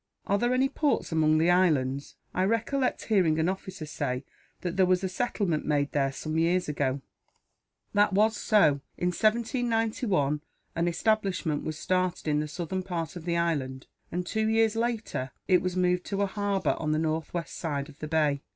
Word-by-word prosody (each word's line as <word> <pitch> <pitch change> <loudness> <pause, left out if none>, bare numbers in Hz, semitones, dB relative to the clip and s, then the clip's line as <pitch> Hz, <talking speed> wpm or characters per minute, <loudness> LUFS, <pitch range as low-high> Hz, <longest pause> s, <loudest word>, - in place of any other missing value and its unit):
"Are 200 +1 +1
there 240 +2 +1
any 260 +1 +3
ports 290 - 0
among 155 -1 +3
the 165 +3 +4
islands? 145 -7 +1 0.2
I 185 - +1
recollect 240 +5 0
hearing 180 -8 +2
an 160 +1 +2
officer 190 -2 -4
say 130 -3 -3 0.4
that 175 -1 -3
there 190 -1 +4
was 185 +1 +2
a - - +1
settlement 190 -6 -1
made 145 -1 +1
there, 135 -2 +1
some 155 +3 -3
years 175 +2 +2
ago." 140 -2 -1 0.9
"That 205 +1 +4
was 215 +3 +3
so. 175 -11 +3 0.2
In 180 - +1
1791 225 - +1 0.3
an 170 +1 +1
establishment 185 -4 0
was 155 -1 -4
started 185 -1 -1
in 150 -1 +2
the 150 - -2
southern 175 +4 -3
part 175 -3 -4
of 170 -2 -8
the 170 -1 0
island 140 -6 -1 0.3
and, 180 +1 -2
two 220 +4 0
years 225 0 +3
later, 225 - -2 0.2
it 185 -2 +4
was 185 0 -2
moved 180 0 +2
to 200 0 -1
a - - +3
harbour 200 0 0
on 155 -1 0
the - - +1
northwest 160 +1 -2
side 145 -4 -3
of 150 -2 -15
the 155 - -5
bay. 150 -3 +1
180 Hz, 180 wpm, -28 LUFS, 155-205 Hz, 0.9 s, the